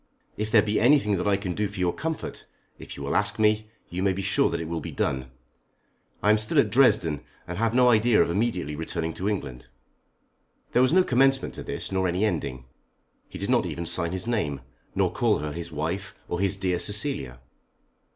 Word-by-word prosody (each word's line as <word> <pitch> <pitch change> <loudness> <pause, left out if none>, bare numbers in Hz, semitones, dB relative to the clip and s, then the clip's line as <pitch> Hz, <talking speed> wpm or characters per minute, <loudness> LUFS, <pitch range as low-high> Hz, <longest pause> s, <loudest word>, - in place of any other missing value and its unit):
If 105 +1 -3
there 110 -2 +5
be 105 0 0
anything 120 -5 +4
that 90 - -2
I 100 -1 +3
can 95 -3 -4
do 105 +3 -1
for 100 -1 -9
your 90 -1 +1
comfort, 160 0 -5 0.3
if - - -9
you - - -6
will - - -2
ask - - +2
me, 110 0 +2 0.2
you 90 +1 -4
may 95 0 +2
be 95 +1 -4
sure - - +2
that - - -2
it 85 - -4
will 85 0 -3
be - - -6
done. 65 -1 -2 0.9
I 105 - +5
am 110 - +4
still 110 0 -1
at 105 - +4
Dresden, 105 - +3 0.3
and 90 +2 -5
have 115 +1 +1
no 125 0 +5
idea 115 0 +4
of - - +3
immediately 90 -7 -1
returning 80 +1 -3
to 95 +5 -2
England." 65 -12 -4 1.0
There 125 - +3
was 130 - +4
no 185 +2 +5
commencement 135 -1 +2
to - - -7
this, - - -4
nor 95 -1 +1
any 90 +4 +1
ending. 70 - -3 0.6
He - - -8
did - - -2
not - - +3
even 85 - -4
sign 85 +1 -1
his 95 +1 -4
name, 80 - -1 0.3
nor - - +2
call - - +2
her 75 0 -4
his 85 +2 -6
wife, 85 +7 -3
or 85 - -3
his 100 0 0
dear 90 -2 0
Cecilia. 105 - -1
100 Hz, 210 wpm, -26 LUFS, 85-110 Hz, 1.0 s, there